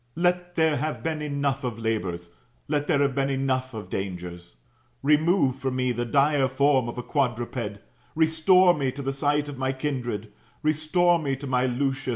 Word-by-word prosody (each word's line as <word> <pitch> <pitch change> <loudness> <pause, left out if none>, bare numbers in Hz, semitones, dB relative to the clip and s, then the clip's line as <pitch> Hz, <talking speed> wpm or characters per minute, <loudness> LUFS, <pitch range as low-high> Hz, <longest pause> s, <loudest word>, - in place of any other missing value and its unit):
Let 175 +1 0
there 160 -3 +3
have 155 +1 -3
been 160 -1 -2
enough 140 -2 -1
of 120 -3 -3
labours, 95 -7 -3 0.4
let 145 -1 -1
there 145 -4 +3
have 140 -1 +1
been 135 +1 0
enough 130 -2 -1
of 110 - -7
dangers. 90 -6 -5 0.5
Remove 150 -1 +3
from 130 -1 -2
me 125 -1 +1
the 120 0 -2
dire 140 +2 +3
form 130 -2 +2
of 120 - -7
a 125 - -4
quadruped, 120 -5 -2 0.4
restore 165 +3 +5
me 140 -5 -1
to 140 - -6
the 135 +1 -1
sight 145 +1 +1
of 140 -3 -7
my 130 0 0
kindred, 120 -7 -4 0.3
restore 155 +3 +2
me 140 -3 -1
to 140 +2 -8
my 130 -1 +1
Lucius 135 +1 -1
[1. - - 0
135 Hz, 185 wpm, -25 LUFS, 125-150 Hz, 0.5 s, restore